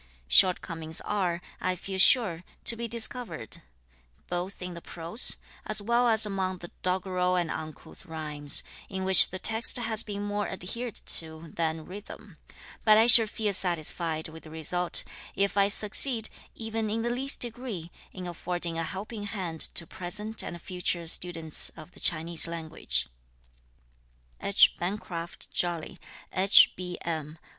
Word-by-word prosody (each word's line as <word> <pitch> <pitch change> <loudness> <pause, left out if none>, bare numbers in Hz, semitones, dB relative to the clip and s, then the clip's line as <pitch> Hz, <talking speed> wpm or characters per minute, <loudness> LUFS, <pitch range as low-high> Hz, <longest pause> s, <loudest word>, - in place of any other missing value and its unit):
Shortcomings 165 - +2
are, 180 -4 -2 0.2
I 185 0 -1
feel 190 +2 -6
sure, 190 -6 +5 0.2
to 230 - +5
be 235 +1 -4
discovered, 225 - -2 0.7
both 180 +2 -4
in 180 -1 -7
the 170 - -10
prose, 170 +9 +1 0.3
as 215 - +1
well 235 +4 +1
as 220 -2 +5
among 190 -2 -3
the 175 -1 -11
doggerel 180 0 -1
and 175 -3 -1
uncouth 155 +3 -9
rhymes, 150 -3 -4 0.3
in 190 -1 -5
which 190 -2 +8
the 185 - -6
text 225 +6 +2
has 225 -3 +2
been 205 -1 -6
more 205 0 -3
adhered 215 +6 -6
to 160 0 -4
than 160 -1 -3
rhythm; 205 -1 -12 0.5
but 215 -1 +5
I 220 - +5
shall 235 -2 +8
feel 210 -1 -2
satisfied 170 -3 -1
with 160 0 -12
the 155 - -14
result, 170 +3 +1 0.3
if 200 0 0
I 200 -1 +3
succeed, 220 +3 +4 0.3
even 225 -1 -4
in 225 +2 -2
the 240 - -1
least 270 +3 -2
degree, 230 -8 -3 0.2
in 185 -1 -9
affording 175 -1 -5
a - - -2
helping 205 +5 -7
hand 185 -6 -5
to 170 - +4
present 210 +6 +2
and 175 - -7
future 180 -1 -3
students 165 -1 +2
of 155 +2 -12
the - - -11
Chinese 165 +1 +3
language. 160 - -3 1.4
H. 200 - +4
BENCRAFT 175 -2 -6
JOLY, 175 -2 -3 0.3
H.B.M. 175 -5 +3
185 Hz, 145 wpm, -27 LUFS, 165-210 Hz, 1.4 s, which